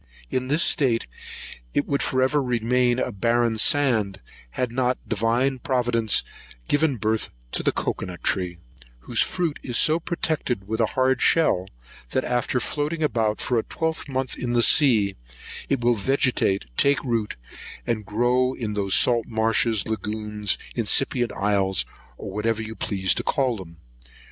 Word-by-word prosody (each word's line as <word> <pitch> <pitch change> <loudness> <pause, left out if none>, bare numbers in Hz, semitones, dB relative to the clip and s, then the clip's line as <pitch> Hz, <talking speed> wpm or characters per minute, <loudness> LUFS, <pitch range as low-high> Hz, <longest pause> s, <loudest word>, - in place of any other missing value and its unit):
In 130 0 -1
this 150 +5 +2
state 125 -6 +3 0.7
it 145 - +2
would 140 -1 -1
for 130 0 +1
ever 145 +3 +2
remain 125 0 +1
a - - -1
barren 115 +2 +1
sand, 110 -9 +2 0.4
had 125 -2 -1
not 125 0 0
Divine 120 +5 0
Providence 120 -4 +2 0.4
given 145 -3 +1
birth 110 +1 -1 0.2
to - - -2
the - - +1
cocoa - - -3
nut 90 -1 -9
tree, 90 -3 0 0.4
whose - - 0
fruit 170 -5 -1
is 120 -3 -2
so 155 +2 +4
protected 155 - -2
with 110 +2 -1
a 110 - +3
hard 130 0 +2
shell, 95 - +3 0.5
that 130 - 0
after 125 +1 0
floating 150 +6 -2
about 110 -7 0
for 120 -2 +1
a - - -2
twelve 160 -3 -3
month 130 -1 -3
in 120 -1 -2
the 120 -1 +3
sea, 110 -10 +4 0.5
it 135 -3 0
will 120 0 +3
vegetate, 120 - +1
take 140 0 +3
root, 115 -5 -1 0.5
and 115 -2 -1
grow 120 +5 +1
in 110 -3 -4
those 100 -2 +1
salt 120 -2 +3
marshes, 110 -2 +1
lagoons, 105 -1 -2 0.2
incipient 120 +1 +1
islands, 95 -7 0 0.3
or 100 - -7
what 105 +3 -1
you 110 0 -5
please 95 -4 0
to - - -2
call 130 -5 0
them. 85 -4 -11
120 Hz, 155 wpm, -24 LUFS, 105-130 Hz, 0.7 s, so